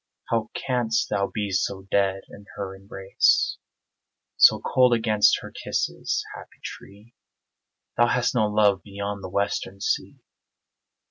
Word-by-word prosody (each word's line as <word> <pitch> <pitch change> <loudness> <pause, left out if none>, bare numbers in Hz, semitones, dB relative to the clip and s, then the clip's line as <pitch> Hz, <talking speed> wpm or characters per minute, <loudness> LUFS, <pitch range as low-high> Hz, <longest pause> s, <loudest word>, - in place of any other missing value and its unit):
How 115 -1 0
canst 120 -4 0
thou 100 0 +1
be 105 -2 -4
so 95 +1 -1
dead 95 -1 +1
in 100 0 -14
her 95 -2 -5
embrace 95 0 +1 0.8
So - - +6
cold 125 -1 +3
against 110 -2 +3
her - - -9
kisses, - - -2
happy - - -12
tree? 105 +4 -11 0.8
Thou 120 +1 +5
hast 125 0 +1
no 110 -4 +2
love 105 -2 +2
beyond 100 0 -6
the 95 - -6
western 100 0 -2
sea. 105 - -2
100 Hz, 130 wpm, -24 LUFS, 100-115 Hz, 0.8 s, So